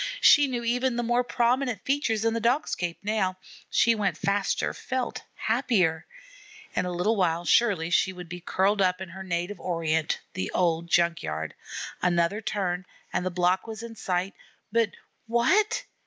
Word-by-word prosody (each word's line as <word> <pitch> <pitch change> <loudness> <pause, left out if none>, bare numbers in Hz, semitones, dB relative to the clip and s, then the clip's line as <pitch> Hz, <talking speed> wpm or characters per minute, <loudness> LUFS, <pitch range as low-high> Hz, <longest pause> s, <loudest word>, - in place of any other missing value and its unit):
She 290 - +7
knew 245 -2 -3
even 245 +1 +1
the 240 - -1
more 240 +1 +2
prominent 245 -2 0
features 240 -6 0
in 225 - +2
the 230 - 0
Dog 245 +6 +2
scape 175 -1 -3
now. 200 -3 0 0.3
She 230 - +4
went 205 -4 -1
faster, 200 +1 0
felt 260 -1 -3
happier. 220 -9 +1 0.7
In 180 - +1
a - - -2
little 180 +6 +1
while 175 -3 +1
surely 180 -6 +3
she 190 - +3
would 180 -1 -9
be 175 +1 -7
curled 195 +3 +1
up 185 -1 +2
in 190 -2 -6
her 190 +3 -9
native 180 +1 -3
Orient 160 -3 0
the 95 - -3
old 170 -1 +1
junk 170 0 +3
yard. 80 0 -4 0.5
Another 175 +4 +1
turn, 185 -4 -2 0.3
and - - 0
the 185 - 0
block 180 +3 +1
was 220 0 -6
in 230 -1 -8
sight. 185 -1 -2 0.4
But 230 -1 +3 0.4
what! 380 - +2
195 Hz, 170 wpm, -27 LUFS, 175-230 Hz, 0.7 s, She